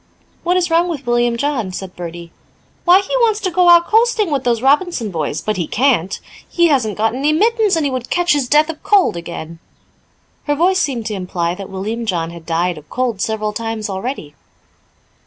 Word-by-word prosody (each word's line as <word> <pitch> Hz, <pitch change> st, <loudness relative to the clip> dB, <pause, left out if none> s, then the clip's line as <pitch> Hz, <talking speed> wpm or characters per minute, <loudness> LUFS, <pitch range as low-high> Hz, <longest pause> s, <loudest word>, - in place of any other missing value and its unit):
"What 355 Hz, +1 st, +1 dB
is 350 Hz, -2 st, 0 dB
wrong 335 Hz, +2 st, +3 dB
with 290 Hz, -6 st, -5 dB
William 240 Hz, 0 st, +1 dB
John?" 275 Hz, -5 st, -1 dB
asked 185 Hz, 0 st, -7 dB
Bertie. 170 Hz, -1 st, -8 dB, 0.5 s
"Why, 365 Hz, +2 st, +6 dB
he 400 Hz, +5 st, -4 dB
wants 450 Hz, -3 st, +2 dB
to 375 Hz, -, -1 dB
go 355 Hz, 0 st, +4 dB
out 345 Hz, 0 st, +7 dB
coasting 445 Hz, -4 st, +2 dB
with 275 Hz, -3 st, 0 dB
those 235 Hz, -1 st, 0 dB
Robinson 280 Hz, -, +1 dB
boys, 155 Hz, -3 st, -3 dB
but 215 Hz, -2 st, -2 dB
he 175 Hz, -, -2 dB
can't. 225 Hz, -8 st, +1 dB, 0.3 s
He 345 Hz, -1 st, +3 dB
hasn't 240 Hz, -8 st, +1 dB
got 225 Hz, +1 st, +1 dB
any 280 Hz, +4 st, +1 dB
mittens 430 Hz, +3 st, +2 dB
and 320 Hz, -2 st, 0 dB
he 280 Hz, -, 0 dB
would 255 Hz, -1 st, -4 dB
catch 350 Hz, -1 st, +2 dB
his 275 Hz, -4 st, -1 dB
death 305 Hz, +2 st, +4 dB
of 305 Hz, -, -15 dB
cold 400 Hz, -, +3 dB
again." 170 Hz, -1 st, -7 dB, 0.9 s
Her 290 Hz, -, +1 dB
voice 370 Hz, +5 st, +2 dB
seemed 260 Hz, -9 st, -1 dB
to 215 Hz, -, -3 dB
imply 180 Hz, -3 st, -2 dB
that 195 Hz, +1 st, -8 dB
William 215 Hz, +5 st, -4 dB
John 170 Hz, -4 st, -1 dB
had 170 Hz, -1 st, -12 dB
died 170 Hz, 0 st, -1 dB
of 150 Hz, -, -20 dB
cold 245 Hz, -6 st, -2 dB
several 215 Hz, -1 st, -2 dB
times 225 Hz, -1 st, -4 dB
already. 190 Hz, -, -5 dB
240 Hz, 200 wpm, -17 LUFS, -, 0.9 s, out